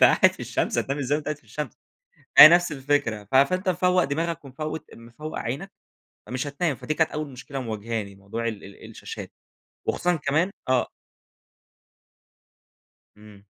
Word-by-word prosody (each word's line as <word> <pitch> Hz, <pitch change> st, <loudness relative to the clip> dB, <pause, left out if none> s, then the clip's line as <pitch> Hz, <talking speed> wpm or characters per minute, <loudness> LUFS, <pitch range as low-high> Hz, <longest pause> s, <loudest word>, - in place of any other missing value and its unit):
أنت -, -, +9 dB
قاعد -, -, +6 dB
في -, -, -14 dB
الشمس، -, -, -1 dB
هتنام 140 Hz, +2 st, -1 dB
إزاي 140 Hz, +1 st, 0 dB
وأنت 150 Hz, -, -7 dB
قاعد 150 Hz, -1 st, -2 dB
في -, -, -29 dB
الشمس؟ 145 Hz, +7 st, -5 dB, 0.7 s
هي 150 Hz, -, +14 dB
نفس 175 Hz, 0 st, +4 dB
الفكرة 135 Hz, -6 st, 0 dB
ف 110 Hz, +6 st, -5 dB
فأنت 185 Hz, +8 st, +3 dB
مفوق 180 Hz, 0 st, +3 dB
دماغك 165 Hz, +2 st, -2 dB
ومفوت 155 Hz, +3 st, -5 dB
مفوق 120 Hz, +7 st, -8 dB
عينك، 160 Hz, +12 st, -4 dB, 0.6 s
فمش 130 Hz, +3 st, -3 dB
هتنام. 145 Hz, 0 st, -1 dB
فدي 155 Hz, -, -3 dB
كانت 160 Hz, 0 st, +2 dB
أوّل 150 Hz, -1 st, -4 dB
مشكلة 135 Hz, +2 st, -7 dB
مواجهاني 110 Hz, -3 st, -4 dB
موضوع 110 Hz, +4 st, -4 dB
ال 105 Hz, -3 st, -6 dB
ال 100 Hz, 0 st, -12 dB
الشاشات، -, -, -8 dB, 0.6 s
وخصوصًا 175 Hz, 0 st, +1 dB
كمان 155 Hz, +5 st, 0 dB, 0.2 s
آه. 130 Hz, -1 st, +2 dB, 2.3 s
إمم. 105 Hz, -1 st, -16 dB
140 Hz, 155 wpm, -25 LUFS, 115-155 Hz, 2.3 s, هي